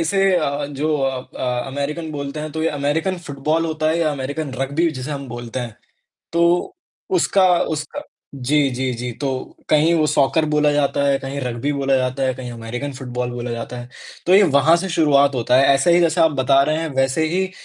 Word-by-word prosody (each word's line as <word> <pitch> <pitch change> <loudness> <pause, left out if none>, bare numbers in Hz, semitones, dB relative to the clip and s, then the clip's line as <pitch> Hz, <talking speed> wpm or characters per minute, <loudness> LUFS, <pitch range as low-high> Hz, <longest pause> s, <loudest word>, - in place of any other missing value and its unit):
इसे 180 +4 +1 0.2
अ, 145 -3 -1
जो 150 +2 -1
अ 135 -1 -1 0.2
अ, 125 -1 -1
अमेरिकन 150 +4 -4
बोलते 140 +1 -5
हैं 155 - -5
तो 160 - -3
ये 165 - +2
अमेरिकन 150 +6 -1
फुटबॉल 150 +4 -1
होता 155 -1 -1
है 165 +2 +1
या 160 -2 +1
अमेरिकन 140 +1 -4
रग्बी 155 +5 +1
जिसे 130 +1 -6
हम 140 -1 -5
बोलते 120 +1 -5
हैं। 115 -3 -7 0.6
तो 170 +1 +2 0.4
उसका 195 - +2 0.2
उसका 155 -1 -3 0.3
जी, 140 +2 +1
जी, 130 0 -2
जी, 120 +1 -4
तो 130 +1 -5
कहीं 155 +3 +4
वो 155 -2 +3
सॉकर 150 +3 +2
बोला 150 -1 +3
जाता 140 -1 +1
है 135 -1 +3
कहीं 135 +1 -5
रग्बी 125 +3 -2
बोला 135 -1 +1
जाता 130 +1 -1
है 130 -1 +1
कहीं 125 -1 -7
अमेरिकन 120 +5 -5
फुटबॉल 125 -2 -4
बोला 120 0 -5
जाता 115 +1 -5
है। 120 - -10 0.4
तो 180 - +4
ये 205 - +7
वहाँ 150 0 +4
से 190 +2 -3
शुरुआत 140 -4 +3
होता 125 +1 +1
है 135 - +5
ऐसे 155 +6 +3
ही 175 - +5
जैसे 165 0 +2
आप 160 -1 +5
बता 135 +1 +4
रहे 155 +2 0
हैं 165 - -2
वैसे 135 +4 +1
ही 190 0 0
140 Hz, 205 wpm, -20 LUFS, 130-155 Hz, 0.6 s, ये